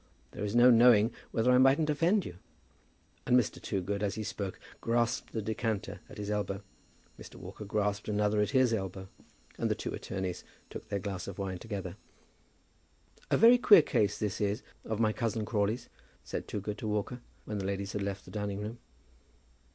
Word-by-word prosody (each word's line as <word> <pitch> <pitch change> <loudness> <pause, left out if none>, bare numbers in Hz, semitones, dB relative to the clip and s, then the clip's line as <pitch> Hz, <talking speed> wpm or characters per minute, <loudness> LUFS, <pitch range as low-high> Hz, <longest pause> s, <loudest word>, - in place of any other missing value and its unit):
There - - -6
is 105 +2 -2
no 120 +1 +8
knowing 115 -2 +6 0.2
whether 120 +2 +2
I 125 - +6
mightn't 140 +4 +4
offend 175 +7 +2
you." 90 - -8 0.9
And 125 - +5
Mr. 125 - 0
Toogood 100 +1 -2
as 100 -2 -1
he 110 - -3
spoke 100 -1 -5 0.2
grasped 120 0 0
the 110 - -3
decanter 110 -1 -2
at - - -11
his 105 0 -4
elbow. 100 -1 -2 0.6
Mr. - - -11
Walker 105 - -9
grasped 105 0 -1
another 105 0 +2
at 105 - +1
his 130 -3 +3
elbow, 95 -2 -4 0.5
and - - +1
the - - +1
two - - -5
attorneys 95 -2 -4 0.3
took - - -8
their 100 - -1
glass 95 -2 -4
of 100 - -7
wine 95 -2 -3
together. 100 -3 -6 1.3
"A - - +3
very 235 +3 +7
queer 205 -9 +8
case 105 -6 +1
this 105 0 -2
is 105 +4 0 0.2
of 110 -1 -3
my 110 -2 +3
cousin 110 0 -1
Crawley's," 105 +1 -1 0.4
said - - -5
Toogood 105 +1 -4
to 115 - -4
Walker, 105 +4 -2 0.2
when 105 -1 -3
the 95 - -3
ladies 100 0 -3
had 105 - -2
left 100 0 -4
the - - -12
dining 105 -2 -3
room. 110 +3 -6
105 Hz, 180 wpm, -31 LUFS, 100-115 Hz, 1.3 s, no